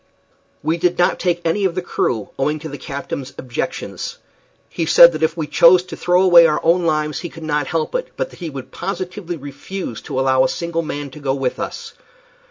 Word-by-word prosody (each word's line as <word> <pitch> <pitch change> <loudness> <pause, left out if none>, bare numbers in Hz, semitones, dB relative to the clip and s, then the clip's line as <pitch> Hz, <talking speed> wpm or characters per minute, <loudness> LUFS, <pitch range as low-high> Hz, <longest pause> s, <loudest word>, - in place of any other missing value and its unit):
We 160 +3 +1
did 175 +1 +1
not 175 - +2
take 175 -2 0
any 180 +5 +1
of 185 -3 +1
the 185 - -1
crew, 115 -10 -2
owing 150 +3 +1
to 155 +1 -7
the 145 -1 -8
captain's 140 -1 -6
objections. 125 -2 -5 0.5
He 165 - -3
said 170 +1 +8
that 155 -1 -5
if 160 +1 +1
we 160 - -1
chose 175 +4 +6
to 180 - -8
throw 180 +1 +2
away 175 -3 +8
our 150 - +1
own 170 0 +3
lives 150 -2 0
he 175 - -6
could 165 0 -11
not 150 -2 -1
help 165 -1 -2
it, - - -1
but - - -2
that - - -15
he 170 -3 -4
would 135 -3 -8
positively 185 -2 -5
refuse 145 - -7
to 130 - -4
allow 130 0 +3
a 130 - +2
single 170 -1 -2
man 145 -3 -5
to 150 - -11
go 135 -2 -1
with 135 -2 -2
us. - - -6
160 Hz, 215 wpm, -19 LUFS, 145-175 Hz, 0.5 s, said